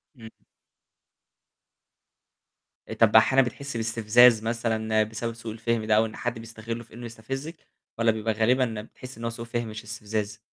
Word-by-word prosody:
امم. 115 -3 -11 2.7
طَب - - +4
أحيانًا 135 0 +6
بتحِسّي 140 0 -6
باستفزاز 115 +1 +5
مثلًا 110 -1 0
بسبب 110 +2 -4
سوء 115 -1 -7
الفهم 115 0 -2
ده، 110 - +3
أو 110 +1 +4
إن 110 - -7
حد 120 -1 -3
بيستغلُّه 115 +1 -7
في - - -20
إنه 120 +1 -8
يستفزِّك؟ 135 +8 -6 0.4
والَّا 115 -1 +3
بيبقى 110 0 -1
غالبًا 115 0 +1
بتحِسّي 125 +2 -12
إن - - -8
هو - - 0
سوء 115 0 -7
فِهم 120 0 -3
مش 110 0 -7
استفزاز؟ 105 -1 -4
115 Hz, 155 wpm, -26 LUFS, 110-120 Hz, 2.7 s, أحيانًا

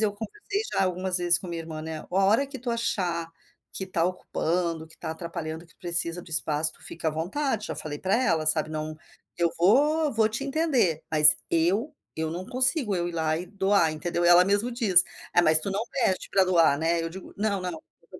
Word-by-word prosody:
eu 215 -2 +1
conversei 405 - -5
já 195 - +2
algumas 185 0 -1
vezes 175 -1 +3
com 185 - -9
minha 170 -1 -4
irmã 155 -1 -7
né, 160 0 -5
"A - - -14
a 190 +2 +1
hora 225 +8 +3
que 275 0 -8
tu 245 0 -4
achar 175 -8 -2 0.4
que 190 - -4
tá 170 -3 -1
ocupando, 170 -2 -2
que 160 - -18
tá - - -6
atrapalhando, 165 0 -6
que 165 - -22
precisa 170 0 -2
do 170 - -15
espaço, 155 0 0
tu - - -20
fica 165 -1 -4
à - - 0
vontade." 210 - -2
Já - - -4
falei 145 -1 -6
pra 190 +4 0
ela, 165 -9 +1
sabe, 155 0 +2
"Não 155 0 -5 0.4
eu 170 -1 +1
vou 290 - +3
vou 220 -1 +2
te 230 +5 -3
entender." 270 - +1
Mas 155 -1 +8
eu 190 - +1 0.2
eu 160 0 -2
não 180 +3 -6
consigo, 255 - +1
eu 175 -1 -1
ir - - -6
lá 160 -1 0
e 170 - -4
doar, 195 -3 +1
entendeu. 175 +2 -2
Ela 175 +1 +7
mesmo 205 +5 +1
diz: 205 -7 +4 0.3
"É, 175 - +5
mas 155 -1 +6
tu 160 - -4
não 195 +2 -1
pede 215 -8 0
pra 195 - +4
doar, 170 -6 +3
né". 165 +2 +1
E - - -3
eu 165 - -3
digo: 190 +3 -11
"Não 205 -1 -1
não, 180 -1 -4
não. 160 - -9 0.2
Eu 165 - -29
175 Hz, 230 wpm, -26 LUFS, 165-210 Hz, 0.4 s, Mas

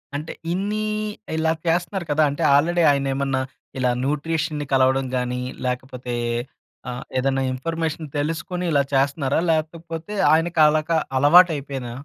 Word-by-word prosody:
అంటే 150 +3 -4 0.2
ఇన్నీ 205 +3 -1 0.5
ఇలా 160 0 +2 0.2
చేస్తన్నారు 175 +2 0
కదా! 155 +1 +3
అంటే 145 +4 -3
ఆల్రెడి 170 +4 +3
ఆయనేమన్నా 135 -1 0 0.4
ఇలా 125 -1 +1
న్యూట్రిషన్‌ని 150 +1 -1
కలవడం‌గాని, 130 -1 +1 0.2
లేకపోతే 125 0 -4 0.8
ఆహ్, 125 +1 -5
ఏదన్నా 135 +1 +1
ఇన్‌ఫర్‌మే‌షన్ 160 +3 -3
తెలుసుకొని 165 +4 -2
ఇలా 140 -2 +3
చేస్తన్నారా? 140 +1 +1
లేకపోతే 165 +3 -3 0.2
ఆయనకి 165 +1 +1
అలాగా 155 +2 +1 0.2
అలవాటు 170 +6 +7
అయిపోయినా? 135 -4 -5
150 Hz, 115 wpm, -22 LUFS, 135-165 Hz, 0.8 s, అలవాటు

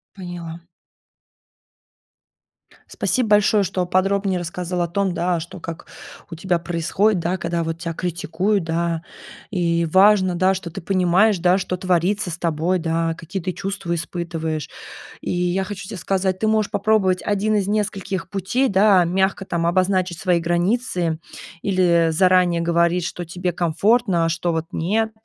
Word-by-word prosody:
Поняла. 175 -3 -7 2.3
Спасибо 250 -3 -1
большое, 210 0 +4
что 185 -1 -1
подробнее 190 +1 +1
рассказал 175 +1 -4
о 170 - -1
том, 190 +1 -1
да, 175 -1 0
что 170 +2 -9
как 165 0 -7 0.4
у - - -5
тебя 175 +1 0
происходит, 175 +4 0
да, 175 +3 -1
когда 170 -1 -2
вот 165 0 -4
тя 170 -1 -4
критикуют, 180 +3 -1
да, 165 0 -1 0.5
и 170 -3 0
важно, 190 +1 +4
да, 185 +2 +2
что 185 -2 -6
ты 195 +4 -7
понимаешь, 185 +3 +3
да, 180 +2 +3
что 185 -1 -3
творится 180 +2 0
с 170 - -5
тобой, 170 +2 0
да, 165 0 -1
какие 170 +4 -6
ты 185 +1 -2
чувства 195 -1 -4
испытываешь. 165 -2 -4 0.5
И - - -3
я 180 +2 0
хочу 195 0 -7
тебе 205 - -6
сказать, 185 +1 -1
ты 220 - 0
можешь 215 -1 +1
попробовать 200 -2 +2
1 210 +1 0
из 200 -2 0
нескольких 200 -4 -2
путей, 205 +8 0
да, 195 -1 +5
мягко 190 +2 0
там 170 -2 -1
обозначить 185 0 +1
свои 180 -4 +2
границы 175 -1 0 0.4
или 175 -4 +3
заранее 180 0 +3
говорить, 170 +1 +1
что 175 0 -5
тебе 180 +2 -3
комфортно, 175 +2 +1
а - - +1
что 170 +1 -1
вот 160 -1 -2
нет, 220 +6 0
180 Hz, 150 wpm, -21 LUFS, 170-195 Hz, 2.3 s, да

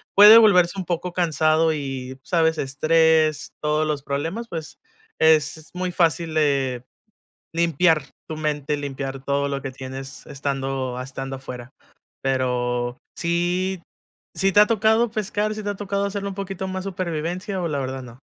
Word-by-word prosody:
puede 210 +3 +10
volverse 195 -4 +5
un 185 - -4
poco 175 +1 -2
cansado, 160 -2 +2
y 135 -3 -5
¿sabes?, 160 -1 +2
estrés, 155 +2 +2
todos 150 +1 +1
los 145 -2 -2
problemas, 165 +12 -3
pues 160 -6 -7 0.4
es 160 0 +3
muy 180 0 -2
fácil 165 -2 +1
eh 135 -4 +1
de - - -45 0.7
limpiar 165 -2 +3 0.3
tu 155 - -5
mente, 150 -1 -1
limpiar 135 -1 -5
todo 140 0 0
lo 140 -1 -3
que 135 - -4
tienes 135 +1 -8
estando 135 -2 -3
estando 135 +1 -5
afuera. 125 -2 -9 0.5
Pero, 125 -2 -1 0.2
¿si 175 +2 0 0.5
si 195 0 +2
te 205 - +5
ha 210 - +7
tocado 220 +1 +3
pescar, 215 0 -1
si 215 - -6
te 205 - -2
ha - - -6
tocado 200 0 -2
hacerlo 200 0 -3
un 195 - -7
poquito 195 -1 -4
más 190 0 -4
supervivencia, 185 +1 -3
o 170 - -1
la 145 -3 -2
verdad 130 0 -4
no? 120 0 -13
155 Hz, 155 wpm, -23 LUFS, 135-185 Hz, 0.7 s, puede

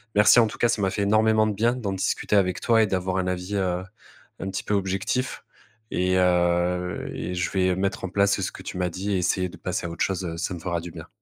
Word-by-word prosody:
Merci, 105 +4 +7
en 115 - +5
tout - - -8
cas, 120 - +2
ça 110 - 0
m'a 95 - +1
fait 100 - -2
énormément 110 +1 +3
de 110 - 0
bien 115 +4 +1
d'en 110 -6 -3
discuter 95 +2 0
avec 90 -2 +1
toi 115 -2 +4
et 110 - +3
d'avoir 95 0 -1
un 95 - 0
avis, 90 +2 -3
heu, 90 -1 -1 0.6
un 95 - -4
petit 95 - -4
peu 105 - -2
objectif 100 +6 -1 0.5
et 90 +1 +1
heu 90 0 +1
et 90 - -4
je 90 -2 -1
vais 95 -1 +2
mettre 95 0 -2
en 95 - -2
place 100 +1 +2
ce 90 - -2
que - - -11
tu - - -7
m'as 90 0 0
dit 95 +4 -3
et 95 - +2
essayer 90 +1 +1
de 95 - -11
passer 90 -1 -3
à - - -3
autre 85 - -2
chose, 95 -1 -2
heu, 85 -1 -4
ça 90 - -2
me 85 - -6
fera 85 0 -2
du 85 - -8
bien. 80 0 -10
95 Hz, 260 wpm, -25 LUFS, 90-100 Hz, 0.6 s, Merci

